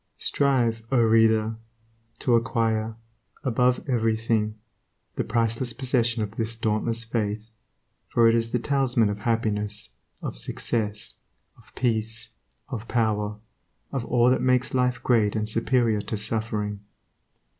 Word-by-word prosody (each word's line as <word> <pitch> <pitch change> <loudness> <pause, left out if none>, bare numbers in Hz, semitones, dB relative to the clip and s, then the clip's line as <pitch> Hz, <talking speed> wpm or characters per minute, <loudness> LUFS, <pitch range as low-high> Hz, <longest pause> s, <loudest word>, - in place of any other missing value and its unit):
Strive, 125 -5 +1
O 130 - +4
reader! 110 -1 +4 0.6
to 125 - +1
acquire, 115 -1 +1 0.5
above 125 0 +1
everything, 110 -3 +1 0.6
the - - 0
priceless 115 +1 0
possession 120 -3 0
of 105 +1 -7
this 115 0 -2
dauntless 115 +1 0
faith, 110 -1 -3 0.6
for 115 -1 +4
it 115 - +5
is 115 0 +1
the - - +2
talisman 125 -4 +2
of 105 - -5
happiness, 105 - -1 0.3
of - - -4
success, 105 - -2 0.4
of - - -21
peace, 110 -2 -1 0.4
of 120 -4 -5
power, 105 -3 0 0.5
of 135 -3 -2
all 120 0 +4
that 130 - +2
makes 125 0 +2
life 125 -1 +1
great 110 -4 +3
and 105 -1 -1
superior 115 -1 +1
to 105 +2 -4
suffering. 105 -1 -2
115 Hz, 125 wpm, -25 LUFS, 110-120 Hz, 0.6 s, it